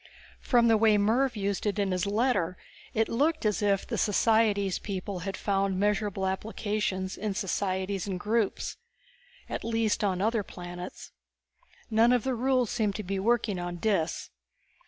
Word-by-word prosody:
From 240 -2 +3
the 225 -1 +5
way 215 -1 +5
Mervv 235 +5 +2
used 200 0 -1
it 205 - -1
in 200 -2 0
his 180 0 0
letter 200 -5 +1 0.4
it 220 0 +2
looked 300 +4 +1
as 210 +1 +1
if 200 -1 +2
the - - -3
societics 210 -2 +2
people 195 -1 -4
had 195 +2 -4
found 195 -2 0
measurable 205 -1 0
applications 190 -1 -2
in 205 -1 -3
societies 190 0 -1
and 185 -2 -3
groups. 215 +1 -1 0.7
At - - -4
least 225 -2 0
on 190 -3 +1
other 220 +2 +1
planets. 180 -1 -8 0.8
None 230 +3 +5
of 245 -3 +2
the 265 - 0
rules 250 -1 +1
seemed 210 -3 0
to 215 - -4
be 195 +1 -2
working 220 -2 +1
on 175 0 -4
Dis. 175 -4 -1
205 Hz, 155 wpm, -28 LUFS, 190-225 Hz, 0.8 s, the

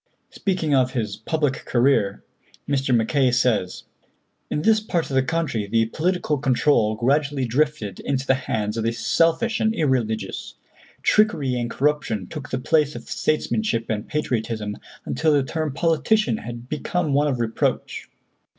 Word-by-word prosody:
Speaking 180 -7 -1
of 130 -2 +3
his 105 -5 -2
public 150 -4 -1
career, 120 -6 +1 0.4
Mr. 135 -2 0
Mackay 130 +4 +2
says: 115 -7 +1 0.7
"In 150 - -2
this 220 +1 +5
part 175 -8 -2
of - - -1
the 130 - +5
country 135 -7 -1
the 115 +2 +2
political 155 +3 -1
control 130 -4 +2
gradually 140 +3 +1
drifted 125 -5 -1
into 135 -1 -2
the 135 - +4
hands 110 -4 -2
of 115 - -1
the 115 +1 0
selfish 165 - +1
and 220 0 +1
irreligious. 125 - -1 0.5
Trickery 165 -12 +3
and 120 -1 -2
corruption 135 -8 0
took 145 +9 -8
the 130 - -1
place 150 +3 +1
of - - -7
statesmanship 155 - 0
and 105 0 -3
patriotism, 110 -7 -2 0.3
until 160 -1 +1
the 145 -2 +3
term 155 +3 -2
politician 165 - +1
had 120 +2 -8
become 155 +2 -1
one 145 +2 +3
of 130 -4 -1
reproach. 115 -1 -2
135 Hz, 150 wpm, -23 LUFS, 115-155 Hz, 0.7 s, this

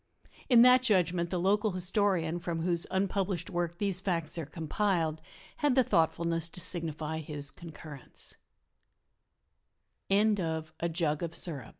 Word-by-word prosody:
In 240 -2 +8
that 250 0 +7
judgment 180 -7 +2
the 180 - -1
local 205 +3 +2
historian 180 -2 +1
from 170 -1 -3
whose 170 -1 0
unpublished 190 -2 -1
work 175 -1 -2
these 195 -2 0
facts 170 -5 -2
are 155 - -5
compiled 160 0 -1 0.4
had 290 -4 +2
the 260 - +5
thoughtfulness 165 -3 +1
to 180 - -5
signify 160 -3 -1
his 145 -2 -4
concurre 155 -4 -10
175 Hz, 105 wpm, -30 LUFS, 165-195 Hz, 0.4 s, In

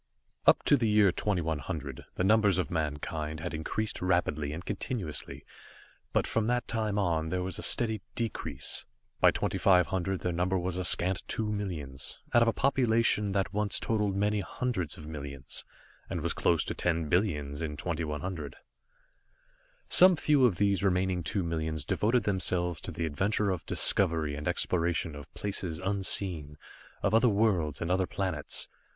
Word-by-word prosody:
Up - - +6
to 145 - +4
the 115 -4 +1
year 105 -2 +5
2100, 80 -7 -3
the - - -1
numbers 105 -2 +4
of 90 - -2
mankind 75 -1 -3
had 85 +2 -5
increased 90 +8 -3
rapidly 80 -5 0
and 80 +4 -7
continuously, 95 -6 -4 0.7
but - - +1
from 110 -1 0
that 120 0 0
time 110 -3 -1
on, 85 -5 0
there 90 +1 -1
was 95 -1 -3
a - - -5
steady 110 -3 +2
decrease. 115 -2 0 0.4
By - - +6
2500, 95 0 +1
their 90 - -1
number 90 +2 0
was 90 0 -2
a 90 - -2
scant 90 +2 +5
two 110 -1 -2
millions, 80 -10 -4 0.2
out 120 - +6
of 115 - +4
a - - +4
population 115 -6 +2
that 95 0 -1
once 105 0 0
totaled 105 -3 0
many 105 +1 +1
hundreds 100 -2 -3
of 75 - -10
millions, 70 -3 -5 0.5
and - - -3
was - - -1
close 85 -2 +2
to - - -4
ten 85 -2 -1
billions 75 -5 0
in 75 -2 -4
2100. 80 0 -4 1.3
Some 185 0 +8
few 145 -5 +4
of 100 - -1
these 100 -1 +1
remaining 95 -1 +1
two 95 +3 -1
millions 80 -2 -3
devoted 115 +2 +1
themselves 90 -3 0
to - - -6
the 85 - -3
adventure 100 +6 0
of 90 - -5
discovery 80 -6 +2
and 75 +1 -5
exploration 85 -2 0
of 70 0 -11
places 95 -5 -4
unseen, 95 -5 -1 0.5
of 100 - +1
other 115 +2 +5
worlds 100 -9 +1
and 85 - -1
other 95 0 +1
planets. 90 -7 -2
90 Hz, 160 wpm, -29 LUFS, 80-105 Hz, 1.3 s, Some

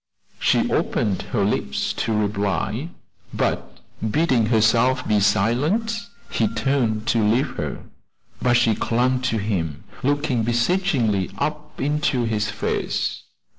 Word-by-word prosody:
She - - +3
opened 100 -3 0
her 105 -6 +1
lips 70 -9 -1
to 115 - -2
reply, 105 - -1 0.4
but - - -2 0.3
bidding 125 -3 +2
her 110 -1 +3 0.5
be 105 -1 +3
silent, 150 - +1 0.2
he 110 - +2
turned 115 -1 0
to 115 -2 +2
leave 115 +6 +2
her; - - -4 0.6
but 120 -1 +4
she 120 -2 +3
clung 125 +4 +1
to 120 -3 0
him, 95 -8 -2 0.2
looking 145 -3 +1
beseechingly 120 - +1
up 150 +4 -4
into 145 -2 +1
his 110 -2 0
face. - - -2
115 Hz, 120 wpm, -22 LUFS, 105-140 Hz, 0.6 s, but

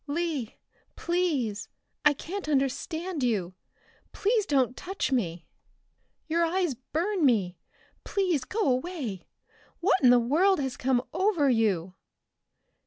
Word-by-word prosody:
"Lee! 295 -6 -2 0.4
Please! 305 - -1 0.3
I 295 - +6
can't 355 +4 -6
understand 310 +5 -1
you. 205 -8 0 0.6
Please 430 0 +1
don't 260 -3 +2
touch 385 -4 -3
me! 175 -10 -1 0.8
Your 335 +2 +1
eyes 345 -2 +1
burn 330 - -2
me 195 - +2 0.4
please 365 -9 0
go 425 - -3
away. 255 - -2 0.5
What 375 +1 +2
in 255 - +6
the 245 - +7
world 320 +11 +3
has 265 -3 -2
come 255 -1 +1
over 360 -9 +2
you?" 195 -7 +1
285 Hz, 115 wpm, -27 LUFS, 245-355 Hz, 0.8 s, the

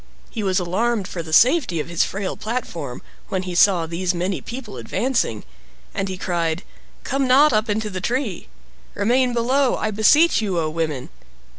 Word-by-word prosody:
He 225 - -4
was 190 -1 +1
alarmed 195 +4 0
for 170 - -5
the 160 -1 -9
safety 245 - +4
of 150 - -3
his 170 -1 +1
frail 195 -1 -3
platform, 170 - -5 0.3
when 190 -1 -1
he 180 -1 -5
saw 175 -1 +4
these 175 +2 -2
many 180 +2 -2
people 235 -3 -8
advancing, 235 - -1 0.5
and 195 - -2
he 185 - -4
cried, 170 -1 -1 0.4
"Come 270 0 0
not 275 +2 +5
up 215 +1 +1
into 210 0 -1
the 185 0 -4
tree. 240 - -2 0.5
Remain 245 +5 +2
below, 255 +3 +2
I 215 - -2
beseech 260 +10 +4
you, 195 -5 -1
O 155 -1 -1
women!" 155 -5 -3
200 Hz, 170 wpm, -21 LUFS, 175-240 Hz, 0.5 s, not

